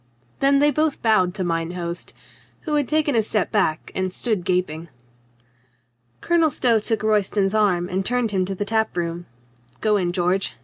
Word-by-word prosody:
Then 275 0 +4
they 295 +1 +4
both 310 -1 -1
bowed 190 -5 +3
to 190 - -2
mine 165 0 -2
host 170 -1 -6 0.2
— - - -28
who 310 - -4
had 290 -3 +1
taken 305 -2 +1
a 225 - +4
step 210 -2 -1
back, 155 0 0
and 185 -1 -1
stood 210 -2 -2
gaping. 170 -2 -2 1.3
Colonel 335 -2 +3
Stow 235 -5 +2
took 220 +1 -2
Royston's 205 -2 +1
arm 190 -5 +2
and 190 +1 -2
turned 240 +1 0
him 190 -2 +1
to 195 +1 -4
the 205 - -3
tap 220 -1 0
room. 170 0 -3 0.5
"Go 215 -1 +2
in, 180 -3 0
George. 180 +2 0
200 Hz, 180 wpm, -22 LUFS, 180-230 Hz, 1.3 s, Then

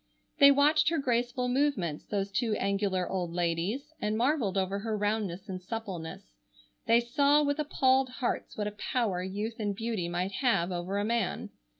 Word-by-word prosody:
They 280 - +9
watched 290 +2 +4
her 330 - 0
graceful 250 -2 0
movements, 250 - 0
those 200 -1 -2
two 220 +1 0
angular 195 -2 0
old 180 -3 -3
ladies, 180 - -1
and 210 +1 0
marvelled 240 -6 +1
over 190 +1 0
her 215 +1 -2
roundness 205 -3 -2
and 185 -2 -5
suppleness. 185 -6 -6 0.6
They 230 +1 +6
saw 280 +5 +3
with 285 +1 0
appalled 265 -3 +2
hearts 250 -1 -3
what 210 - -1
a 210 - -2
power 210 -3 -1
youth 205 +5 -4
and 205 -2 -1
beauty 220 -5 -2
might 180 +2 -2
have 200 -6 +1
over 180 +3 -3
a 205 - 0
man. 235 +1 -1
215 Hz, 170 wpm, -29 LUFS, 190-250 Hz, 0.6 s, They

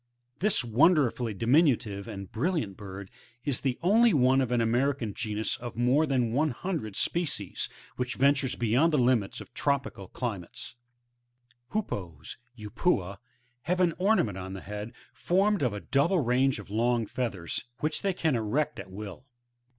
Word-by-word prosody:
This 205 -7 +2
wonderfully 120 - +3
diminutive 115 - +2
and 100 -4 -7
brilliant 140 - -1
bird, 95 -1 -9 0.3
is 140 -4 0
the 130 -3 0
only 220 +3 +5
one 130 0 +4
of 130 - 0
an 120 - +2
American 120 0 +1
genus, 110 -1 -2
of 120 -1 -7
more 125 +7 +3
than 125 -4 +1
a 150 0 +2
hundred 140 - -4
species, 150 - -1 0.3
which 125 0 -2
ventures 140 -1 +2
beyond 120 +8 +2
the 150 - +2
limits 120 -5 +2
of - - -13
tropical 135 -9 -1
climates. 105 -8 -5 1.0
8. - - -25
The 215 - +2 0.8
HoopoeVf—Upupa, 100 - 0 0.2
— 120 0 -41
have 180 0 +2
an 175 -2 +3
ornament 180 - +2
on 95 +1 -6
the 95 - -7
head 105 +2 -6 0.2
formed 195 +7 +2
of 125 -4 +2
a 105 - -4
double 140 - +2
range 130 0 +2
of 100 -1 -10
long 115 +1 +1
feathers, 105 -9 -3 0.2
which 155 - 0
they 200 - +1
can 160 -6 +1
erect 130 +8 -1
at 95 -1 -8
will. 105 +6 -8
125 Hz, 160 wpm, -28 LUFS, 105-150 Hz, 1.0 s, only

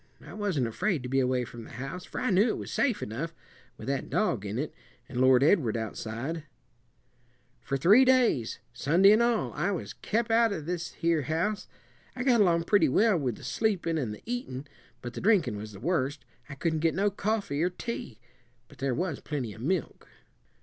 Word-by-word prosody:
I - - -10
wasn't 195 - 0
afraid 150 - -1
to 125 - -5
be 135 +1 +2
away 125 -1 +1
from 120 -1 -10
the - - -12
house 135 +9 -6
for - - -6
I 255 - 0
knew 195 +5 +4
it - - -1
was - - -6
safe 245 -7 +1
enough, 160 +10 -5 0.4
with - - -9
that 140 -1 -2
dog 120 - 0
in 105 +3 -3
it, 145 +4 -3 0.3
and 125 -1 -3
Lord 130 0 +6
Edward 140 - +3
outside. 115 +8 -4 1.2
For 135 +4 -2
three 200 - +6
days, 250 - +3 0.2
Sunday 170 +11 +5
an 215 +2 +5
all, 235 -2 +1
I 180 - 0
was 190 -4 -3
kep' 230 +2 -1
out 230 0 +4
of 155 -6 -5
this 170 0 -3
here 165 -2 +1
house. 165 +9 -1 0.5
I 250 - -3
got 245 -4 +4
along 170 -4 +3
pretty 165 -4 +4
well 215 - +4
with 130 -8 -1
the - - -14
sleepin' 180 -7 0
and 120 -7 -2
the 105 - -9
eatin', 215 - -4 0.4
but 120 0 -5
the - - -6
drinkin' 195 - +3
was 105 +1 -7
the 100 - -11
worst. 145 - -1 0.2
I 140 - -7
couldn' 160 +2 -1
get 165 +1 +1
no 200 +2 +2
coffee 200 -7 -1
or 175 - +2
tea; 180 - -6 0.5
but - - -17
there 135 -2 0
was 170 -4 -2
plenty 130 -8 -4
of 110 - -12
milk." 175 +6 -2
165 Hz, 200 wpm, -28 LUFS, 130-205 Hz, 1.2 s, Lord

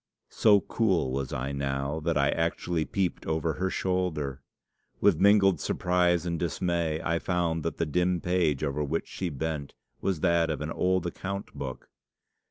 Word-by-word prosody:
So 105 -3 +5
cool 95 - +1
was 65 -1 -2
I 65 +2 -3
now, 70 +2 -2
that 80 0 0
I 70 0 +3
actually 80 0 -1
peeped 95 -3 -2
over 80 0 0
her 95 +5 -1
shoulder. 85 -8 -1 0.6
With 95 -6 +4
mingled 100 -1 +5
surprise 90 -1 +1
and 85 -2 -2
dismay 85 -1 -1
I 85 0 0
found 85 -3 0
that 85 - -3
the 85 - 0
dim 90 +3 +1
page 85 -5 +1
over 75 0 -1
which 70 - -2
she 90 - -3
bent 75 -1 -4 0.3
was 95 -6 -1
that 85 -2 +3
of 75 - -2
an 75 +1 -3
old 90 0 +1
account 100 +3 -5
book. 65 -2 -6
85 Hz, 165 wpm, -28 LUFS, 75-90 Hz, 0.6 s, So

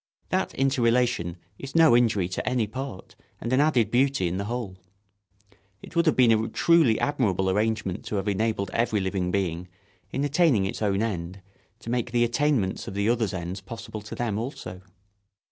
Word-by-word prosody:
That - - -1
interrelation 120 - +1 0.2
is 135 +2 -8
no 160 -6 +6
injury 110 -6 +2
to 95 - -2
any 125 -3 +1
part 130 -2 -7 0.2
and 115 +3 -3
an 130 - +4
added 125 -8 +2
beauty 130 -6 +2
in 85 +2 -2
the 100 - -3
whole. 110 -5 -5 1.0
It - - -12
would 170 0 +2
have 155 - +4
been 125 -3 +5
a 110 0 +2
truly 160 -9 +3
admirable 95 -10 +1
arrangement 105 -1 -1
to - - -4
have 100 0 -2
enabled 105 0 -1
every 115 -2 +1
living 95 -1 -1
being, 90 -2 -2 0.4
in 135 - -1
attaining 145 - +3
its 95 - -4
own 100 0 +1
end, 95 -3 -4 0.4
to 115 - -6
make 120 -1 -1
the 120 0 +3
attainments 120 -4 0
of 95 - -6
the 100 +1 0
others' 115 -5 +1
ends 90 +1 -5
possible 110 +1 -8
to 105 - -8
them 110 -4 -2
also. 100 -7 -6
110 Hz, 180 wpm, -26 LUFS, 95-125 Hz, 1.0 s, no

